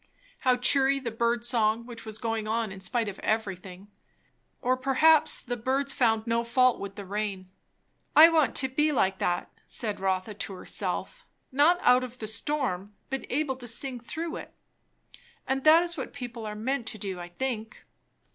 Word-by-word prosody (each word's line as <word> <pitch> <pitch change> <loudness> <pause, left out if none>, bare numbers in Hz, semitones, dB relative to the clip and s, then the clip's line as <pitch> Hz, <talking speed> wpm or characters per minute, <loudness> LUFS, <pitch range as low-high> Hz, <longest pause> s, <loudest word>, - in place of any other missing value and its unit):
how 255 -1 +3
cheery 275 +2 +3
the 245 -4 -4
bird 235 +1 0
song 230 -1 +2
which 235 -2 -10
was 220 -1 -6
going 225 -1 -3
on 225 -1 -1
in 190 - -9
spite 220 +5 -1
of 200 -1 -6
everything! 195 -3 -3 0.7
Or 255 +1 +1
perhaps 275 +4 +4
the 245 0 -4
birds 265 +4 0
found 225 -3 +2
no 230 0 0
fault 255 +1 +3
with 200 0 -7
the 200 - -7
rain. 195 -2 -4 0.6
I 315 +2 +10
want 315 -4 +2
to 265 - +4
be 300 +4 +1
like 190 -8 +1
that, 175 0 -1 0.2
said 215 -4 -2
Rotha 190 +2 -1
to 205 -1 -6
herself; - - -4 0.2
not 290 +6 +5
to 355 - -10
be - - -9
out 250 +1 +5
of 250 0 -8
the 220 - -6
storm, 215 -5 -2 0.2
but 270 - -2
to - - -13
be - - -6
able 280 -3 -1
to 245 -2 -9
sing 250 +2 0
through 325 +8 -5
it. - - -10 0.9
And 265 0 -1
that 320 +2 +7
is 345 -1 +1
what 265 - -5
people 240 -5 -7
are 210 - -5
meant 240 +2 -2
to 220 - -6
do, 190 -3 -5
I 175 0 -8
think. 225 +2 -5
235 Hz, 195 wpm, -27 LUFS, 210-265 Hz, 0.9 s, I